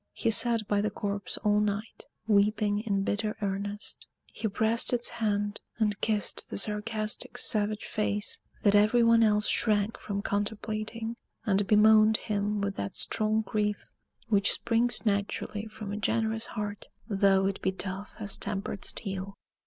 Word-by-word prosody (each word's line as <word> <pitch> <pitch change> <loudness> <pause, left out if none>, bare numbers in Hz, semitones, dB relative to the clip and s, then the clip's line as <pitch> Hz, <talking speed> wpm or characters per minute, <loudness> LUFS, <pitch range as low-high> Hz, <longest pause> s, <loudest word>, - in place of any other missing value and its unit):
He 230 - 0
sat 230 -1 +3
by 205 -1 +2
the 210 - 0
corpse 200 -1 -4
all 210 -1 +3
night, 210 +1 -3 0.2
weeping 210 0 +2
in 200 -3 -1
bitter 210 +2 -2
earnest. 205 +1 -5 0.3
He 220 - -2
pressed 220 +3 +2
its 240 -1 +1
hand, 205 -2 -1 0.2
and 210 -2 0
kissed 215 -2 -1
the - - -4
sarcastic, 215 +1 -2
savage 215 0 +2
face 210 -1 -2 0.2
that 205 - +4
every 215 +3 +5
one 230 0 +5
else 210 -1 +3
shrank 210 -1 +1
from 200 -1 -4
contemplating; 215 +2 -3 0.3
and 200 -2 +2
bemoaned 215 0 +6
him 205 -1 -2
with 200 0 -2
that 100 - -4
strong 215 0 +2
grief 210 -2 -2 0.4
which 205 -3 +3
springs 235 +1 0
naturally 205 +1 -1
from 215 -2 -8
a 205 - -3
generous 225 +1 -1
heart, 205 -1 -5 0.2
though 195 -2 +3
it 195 0 -2
be 190 - +1
tough 190 +1 -6
as 205 -2 -2
tempered 200 0 -4
steel. 195 -1 -3
210 Hz, 150 wpm, -29 LUFS, 200-220 Hz, 0.4 s, bemoaned